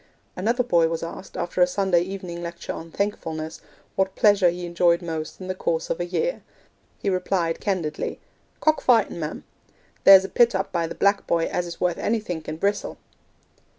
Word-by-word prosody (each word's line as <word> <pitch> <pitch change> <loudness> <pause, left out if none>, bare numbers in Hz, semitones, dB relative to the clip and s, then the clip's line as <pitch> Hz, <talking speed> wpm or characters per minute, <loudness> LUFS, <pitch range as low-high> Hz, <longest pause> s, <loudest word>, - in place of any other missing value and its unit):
Another 230 +7 +1
boy 170 -8 +3
was 165 0 -3
asked, 170 +3 -8
after 175 +1 -2
a 180 - +7
Sunday 180 -2 +2
evening 180 -2 -5
lecture 170 0 -5
on 165 - -8
'Thankfulness,' 160 -5 -3 0.3
what 190 0 0
pleasure 205 -4 +5
he 175 +1 -4
enjoyed 170 0 +2
most 160 -2 -5
in 185 - -7
the 185 - -1
course 165 -3 -2
of - - -2
a 175 - -1
year. 475 - -1 0.6
He - - -6
replied 180 -3 0
candidly, 175 -7 -2 0.4
'Cock 310 0 +3
fightin', 225 -8 +3
ma'am; 155 -1 -5 0.6
there's 190 -1 +9
a - - -6
pit 235 -3 +4
up 195 +1 -1
by 170 -2 0
the - - -7
"Black 200 0 +2
Boy" 165 -1 +2
as 175 0 -2
is 170 - -8
worth 180 -2 0
anythink 195 -9 -2
in 155 - -4
Brissel.' 200 +4 -1
180 Hz, 185 wpm, -24 LUFS, 170-195 Hz, 0.6 s, there's